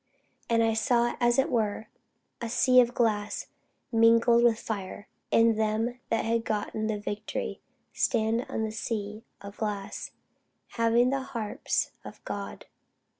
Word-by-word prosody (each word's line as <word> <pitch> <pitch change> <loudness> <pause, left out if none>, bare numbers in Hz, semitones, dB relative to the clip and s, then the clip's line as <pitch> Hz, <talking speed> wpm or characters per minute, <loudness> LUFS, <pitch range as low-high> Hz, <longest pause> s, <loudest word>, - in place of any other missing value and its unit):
And 230 -1 +3
I 225 0 +2
saw 235 +2 +2
as 240 0 +3
it 270 - +3
were 220 -2 0 0.6
a 235 - -3
sea 255 +2 +5
of 245 0 +3
glass 210 -3 0 0.4
mingled 230 +1 +5
with 235 -2 +4
fire: 205 -1 -5 0.2
and 230 -1 +4
them 220 +3 0
that 225 - 0
had 230 0 +1
gotten 215 0 -2
the 215 -1 -1
victory 205 +1 -4 0.3
stand 225 +2 +1
on 220 - -2
the 220 - -2
sea 215 -1 -4 0.2
of 200 0 -10
glass, 205 -2 -4 0.6
having 230 +2 +2
the 275 0 0
harps 230 -5 -2
of - - -12
God. - - -6
225 Hz, 140 wpm, -28 LUFS, 215-235 Hz, 0.6 s, sea